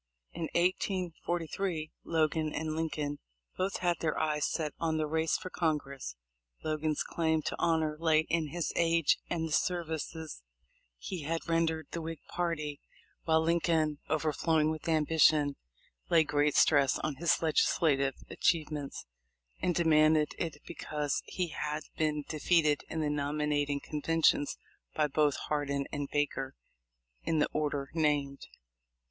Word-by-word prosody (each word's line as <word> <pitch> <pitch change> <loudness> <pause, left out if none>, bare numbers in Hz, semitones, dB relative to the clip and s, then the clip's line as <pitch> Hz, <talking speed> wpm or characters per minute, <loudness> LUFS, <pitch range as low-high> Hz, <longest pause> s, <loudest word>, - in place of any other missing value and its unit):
In 165 -1 -4
1843, 175 -2 -1
Logan 155 -1 +1
and 155 0 -2
Lincoln 155 -3 -2 0.4
both 190 +2 -1
had 175 -2 +1
their 160 -2 -1
eyes 150 -1 +1
set 155 -3 -2
on 160 -1 0
the 155 - +1
race 160 +1 +1
for 185 - -8
Congress. 140 - -2 0.5
Logan's 155 -1 -1
claim 160 -2 0
to - - -2
the - - -6
honor 160 -2 +1
lay 160 -1 +4
in 160 0 -1
his 170 +2 -3
age 165 -2 +3
and 165 -2 -1
the - - -8
services 160 - -2 0.6
he 175 - -5
had 165 +3 -3
ren 165 0 +3
dered 160 0 -2
the 170 - -3
Whig 165 0 -5
party, 155 -4 -2 0.5
while 160 -1 +4
Lincoln, 160 -3 +1
overflowing 155 0 +2
with 160 +1 -4
ambition, 155 -2 +4 0.5
lay 165 -1 +6
great 145 -1 +1
stress 140 -3 +5
on 155 -3 -3
his 170 +2 +2
legislative 145 -3 +2
achievements, 150 -4 -1 0.6
and 175 - +1
demanded 155 -2 +4
it 165 -3 -3
because 150 -1 -2
he 180 -2 -2
had 150 0 -3
been 150 -1 0
defeated 155 -1 +2
in 160 - -2
the 150 - 0
nominating 145 0 0
conventions 150 0 +1 0.4
by 155 - +3
both 150 0 +2
Hardin 140 -2 -2
and 145 -1 -3
Baker 145 -2 -1 0.7
in 165 - 0
the 150 - +2
order 145 -2 -1
named. 145 -3 0
155 Hz, 140 wpm, -31 LUFS, 150-165 Hz, 0.7 s, lay